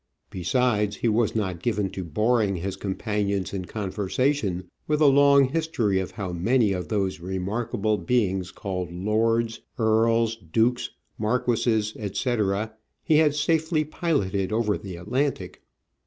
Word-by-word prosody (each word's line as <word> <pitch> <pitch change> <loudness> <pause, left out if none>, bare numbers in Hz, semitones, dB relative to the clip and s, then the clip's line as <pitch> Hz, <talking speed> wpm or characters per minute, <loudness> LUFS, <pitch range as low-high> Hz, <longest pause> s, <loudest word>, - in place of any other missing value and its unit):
Besides, 105 +3 +1
he - - -1
was 110 0 +1
not 95 -6 -2
given 105 -4 0
to 95 - -5
boring 105 +4 +1
his 95 +2 -3
companions 100 0 -2
in 95 -2 -3
conversation 100 0 -1 0.2
with 150 0 +1
a 155 - +5
long 140 -1 +6
history 130 -11 0
of 95 - -3
how 95 -5 -5
many 110 +5 +2
of 90 -1 -4
those 95 -4 -1
remarkable 100 +4 -2
beings 95 -2 0
called 90 -2 -4
lords, 115 +5 0 0.2
earls, 115 0 +2
dukes, 115 +7 0 0.3
marquesses, 110 -1 +1
etc., 105 0 -1 0.3
he 155 -3 +4
had 150 -2 +4
safely 160 +1 +1
piloted 105 - -1
over 110 -2 +1
the 95 -4 -7
Atlantic. 130 +11 -2
110 Hz, 130 wpm, -25 LUFS, 95-120 Hz, 0.3 s, long